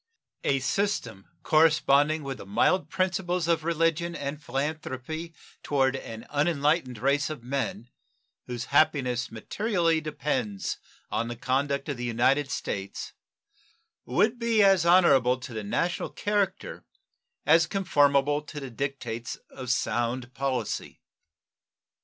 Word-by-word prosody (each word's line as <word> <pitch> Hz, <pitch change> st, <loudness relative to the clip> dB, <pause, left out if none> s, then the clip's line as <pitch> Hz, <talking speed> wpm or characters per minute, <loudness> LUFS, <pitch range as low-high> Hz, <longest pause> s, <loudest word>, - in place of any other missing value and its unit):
A 135 Hz, -, +2 dB
system 130 Hz, -, -2 dB, 0.2 s
corresponding 155 Hz, -1 st, +4 dB
with 135 Hz, -1 st, -5 dB
the -, -, -9 dB
mild 120 Hz, -, +2 dB
principles 180 Hz, -2 st, 0 dB
of 165 Hz, -2 st, +2 dB
religion 165 Hz, +1 st, 0 dB
and 145 Hz, 0 st, -4 dB
philanthropy 155 Hz, +3 st, -4 dB, 0.3 s
toward 135 Hz, -2 st, +1 dB
an 115 Hz, -3 st, -7 dB
unenlightened 145 Hz, -3 st, +1 dB
race 140 Hz, +6 st, +1 dB
of 155 Hz, -6 st, -7 dB
men, 125 Hz, -3 st, -3 dB, 0.6 s
whose 125 Hz, 0 st, -4 dB
happiness 125 Hz, -5 st, +2 dB
materially 165 Hz, -, 0 dB
depends 145 Hz, -9 st, -2 dB, 0.3 s
on 115 Hz, -, -1 dB
the 120 Hz, -, -5 dB
conduct 140 Hz, +4 st, -1 dB
of 140 Hz, -4 st, -3 dB
the 120 Hz, -, -5 dB
United 130 Hz, +4 st, +2 dB
States, 100 Hz, -7 st, -4 dB, 0.9 s
would 215 Hz, -, +1 dB
be 230 Hz, -2 st, +3 dB
as 190 Hz, -4 st, +5 dB
honorable 135 Hz, -9 st, +5 dB
to 125 Hz, -1 st, -9 dB
the 110 Hz, -1 st, -4 dB
national 170 Hz, -, -1 dB
character 205 Hz, -2 st, -2 dB, 0.6 s
as 165 Hz, +2 st, +5 dB
conformable 145 Hz, -6 st, +2 dB
to 150 Hz, 0 st, -8 dB
the 135 Hz, -3 st, -7 dB
dictates 120 Hz, -2 st, -4 dB, 0.2 s
of 130 Hz, -2 st, -7 dB
sound 120 Hz, +1 st, -1 dB
policy. 130 Hz, -5 st, -3 dB
140 Hz, 120 wpm, -27 LUFS, 125-165 Hz, 0.9 s, as